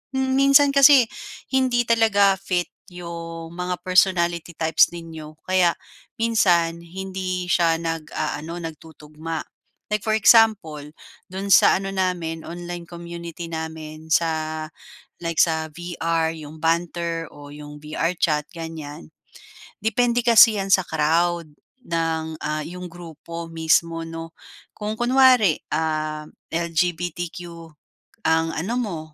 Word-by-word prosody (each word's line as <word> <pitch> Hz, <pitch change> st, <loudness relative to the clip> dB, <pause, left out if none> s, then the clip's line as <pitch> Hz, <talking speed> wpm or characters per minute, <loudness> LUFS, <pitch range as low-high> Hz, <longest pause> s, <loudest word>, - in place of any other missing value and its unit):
Hmm, 265 Hz, 0 st, 0 dB
minsan 275 Hz, +1 st, +6 dB
kasi 275 Hz, -1 st, +7 dB, 0.5 s
hindi 260 Hz, -2 st, +2 dB
talaga 220 Hz, -4 st, +3 dB
fit 180 Hz, -2 st, -1 dB, 0.2 s
yung 165 Hz, -1 st, -7 dB
mga 180 Hz, +1 st, -3 dB
personality 175 Hz, -2 st, +2 dB
types 160 Hz, -1 st, +4 dB
ninyo 160 Hz, -2 st, -9 dB
kaya 185 Hz, -2 st, +2 dB, 0.4 s
minsan 175 Hz, -7 st, +2 dB
hindi 185 Hz, +1 st, -5 dB
siya 170 Hz, -2 st, +3 dB
nag-aano, 165 Hz, -1 st, -4 dB
nagtutugma. 160 Hz, 0 st, -7 dB, 0.5 s
Like 210 Hz, 0 st, -1 dB
for 215 Hz, -, +3 dB
example, 210 Hz, -10 st, +4 dB, 0.4 s
dun 195 Hz, +2 st, -5 dB
sa -, -, +7 dB
ano 195 Hz, 0 st, -3 dB
namin 175 Hz, -4 st, -2 dB
online 175 Hz, 0 st, -7 dB
community 170 Hz, -1 st, -8 dB
namin 160 Hz, -1 st, -7 dB
sa 160 Hz, -1 st, 0 dB, 0.6 s
like 165 Hz, -1 st, -3 dB
sa 160 Hz, -1 st, +1 dB
VR, 165 Hz, 0 st, -2 dB
yung 155 Hz, -1 st, -10 dB
Banter, 165 Hz, 0 st, -1 dB
o 145 Hz, 0 st, -12 dB
yung 150 Hz, 0 st, -10 dB
VRChat, 155 Hz, -1 st, -1 dB
ganyan, 155 Hz, -, -8 dB, 0.7 s
depende 240 Hz, +2 st, +1 dB
kasi 230 Hz, -2 st, +7 dB
'yan 195 Hz, -1 st, -2 dB
sa 185 Hz, -1 st, +4 dB
crowd 165 Hz, +1 st, +1 dB, 0.3 s
ng, 165 Hz, -3 st, -1 dB
ah, 155 Hz, 0 st, -3 dB
yung 180 Hz, +3 st, -7 dB
grupo 170 Hz, -1 st, -9 dB
mismo, 165 Hz, 0 st, +1 dB
'no? 165 Hz, 0 st, -7 dB, 0.4 s
Kung 210 Hz, +1 st, -5 dB
kunwari, 245 Hz, -, +4 dB, 0.2 s
um, 155 Hz, -1 st, -2 dB, 0.2 s
LGBTQ 170 Hz, +1 st, -2 dB, 0.8 s
ang 160 Hz, 0 st, +2 dB
ano 190 Hz, +9 st, -2 dB
mo, 200 Hz, -9 st, -3 dB
170 Hz, 115 wpm, -23 LUFS, 160-185 Hz, 0.8 s, kasi